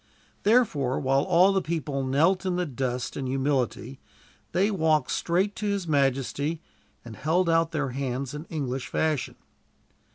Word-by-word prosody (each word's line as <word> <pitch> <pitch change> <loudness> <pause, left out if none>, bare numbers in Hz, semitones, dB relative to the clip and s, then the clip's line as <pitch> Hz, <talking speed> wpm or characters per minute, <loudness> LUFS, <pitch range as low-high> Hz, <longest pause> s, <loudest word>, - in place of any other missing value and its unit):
Therefore 200 - +2
while 135 +1 +2
all 180 +6 +4
the 195 - +2
people 150 -5 -2
knelt 155 +9 +2
in 185 -2 -1
the 180 0 0
dust 125 -3 -3
in 135 - -3
humility, 135 0 -1 0.5
they 195 +4 +2
walked 160 -7 +1
straight 185 +4 0
to 210 - -2
his 200 -3 -1
majesty, 140 +2 0 0.5
and 115 -2 -9
held 170 +8 +1
out 165 0 +3
their 145 -4 -2
hands 130 0 -3
in 150 +2 -6
English 135 -6 -4
fashion. 155 -4 -1
150 Hz, 150 wpm, -26 LUFS, 135-175 Hz, 0.5 s, all